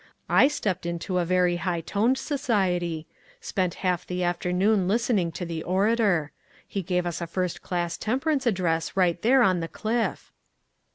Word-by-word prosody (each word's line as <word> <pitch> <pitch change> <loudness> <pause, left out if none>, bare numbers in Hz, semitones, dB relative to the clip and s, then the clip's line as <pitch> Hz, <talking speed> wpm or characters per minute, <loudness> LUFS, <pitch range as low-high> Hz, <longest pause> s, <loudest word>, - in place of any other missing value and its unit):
I - - +6
stepped 205 -12 -2
into 175 +1 -1
very 180 0 +2
high 175 -1 -2
toned 225 +9 +1
society; 190 - -1 0.3
spent 185 - -2
half 180 -1 +1
the 180 0 -2
af 175 0 0
ternoon 185 +2 +2
listening 210 -4 +1
to 175 +3 -4
the 165 -1 -4
orator. 190 -4 +1 0.4
He 195 - -3
gave 180 0 -1
us 175 -1 -3
a 170 - -3
first 180 +1 -2
class 175 -2 -2
temperance 270 +3 0
address 175 -5 0
right 175 -2 +2
there 255 +3 +5
on 185 -4 +3
the 165 - -3
cliff." 225 +6 -2
180 Hz, 160 wpm, -26 LUFS, 175-220 Hz, 0.4 s, I